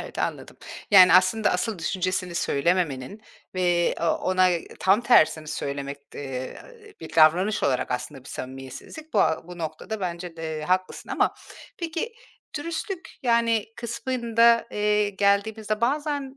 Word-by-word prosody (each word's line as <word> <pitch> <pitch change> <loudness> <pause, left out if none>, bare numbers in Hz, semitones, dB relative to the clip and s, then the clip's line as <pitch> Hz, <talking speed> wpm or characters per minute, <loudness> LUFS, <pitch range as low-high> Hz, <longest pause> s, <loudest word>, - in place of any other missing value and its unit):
Evet, - - -9
anladım. - - -3 0.3
Yani, 185 -2 +8
aslında 185 +4 +4
asıl 185 +2 -1
düşüncesini 185 +1 -2
söylememenin 170 +2 0 0.3
ve 175 -2 +2
o - - -1
ona 185 +2 +2
ı 175 - +1 0.2
tam 195 +4 +4
tersini 155 -10 +4
söylemek, 140 -1 -4 0.2
eee, 130 -2 -6 0.4
bir - - -9
davranış 175 +7 +4
olarak 130 -2 0
aslında 130 +1 -4
bir - - -11
samimiyetsizlik. 135 - -8
Bu - - +3
a 160 +1 +1
bu 180 0 -9
noktada 165 +7 -5
bence 175 -2 -5
de 160 -1 -4
haklısın 185 +3 -1
ama, - - +1 0.4
peki, 340 +7 -4 0.4
dürüstlük, 335 +4 -5
yani, 230 -3 +2
kısmında, 235 -1 +2
eee, 210 0 +1
geldiğimizde 210 +2 0
bazen 285 +1 -1
185 Hz, 130 wpm, -25 LUFS, 160-230 Hz, 0.4 s, Yani